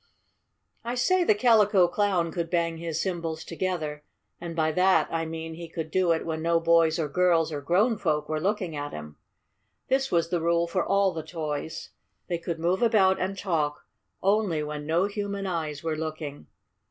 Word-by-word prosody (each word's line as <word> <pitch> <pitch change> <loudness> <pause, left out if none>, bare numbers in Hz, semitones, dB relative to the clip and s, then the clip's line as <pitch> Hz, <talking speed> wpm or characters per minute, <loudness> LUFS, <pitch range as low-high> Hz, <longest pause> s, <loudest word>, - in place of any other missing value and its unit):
I 240 +1 -3
say 365 +9 +3
the 215 - +4
Calico 210 -5 +5
Clown 180 -3 0
could 170 0 -3
bang 170 -1 0
his 165 -1 -3
cymbals 170 -4 -3
together, 160 -4 -3 0.4
and 170 -1 -6
by 160 -1 +1
that 185 +4 +3
I 165 -1 -1
mean 160 0 -6
he 170 0 -8
could 160 -1 -5
do 185 -1 +2
it 160 - 0
when 160 -1 -3
no 165 +1 +2
boys 165 -1 +3
or 160 -3 -1
girls 165 +1 +2
or 145 -2 -4
grown 200 - +2
folk 150 -5 0
were 155 0 -1
looking 190 -3 -1
at 145 0 -5
him. 75 -1 -8 0.7
This 265 +1 +1
was 170 -1 +2
the 175 -2 0
rule 170 +1 +2
for 170 - -1
all 195 -1 +2
the 160 - -4
toys. 155 -1 -5 0.4
They 175 -1 -2
could 170 -1 -4
move 175 +3 0
about 200 -5 +4
and 190 +1 -2
talk 160 -6 -1 0.4
only 195 -6 +2
when 150 0 -5
no 170 +4 +2
human 200 -1 -3
eyes 160 -5 -3
were 160 -1 -1
looking. 155 -2 -6
170 Hz, 185 wpm, -27 LUFS, 160-190 Hz, 0.7 s, Calico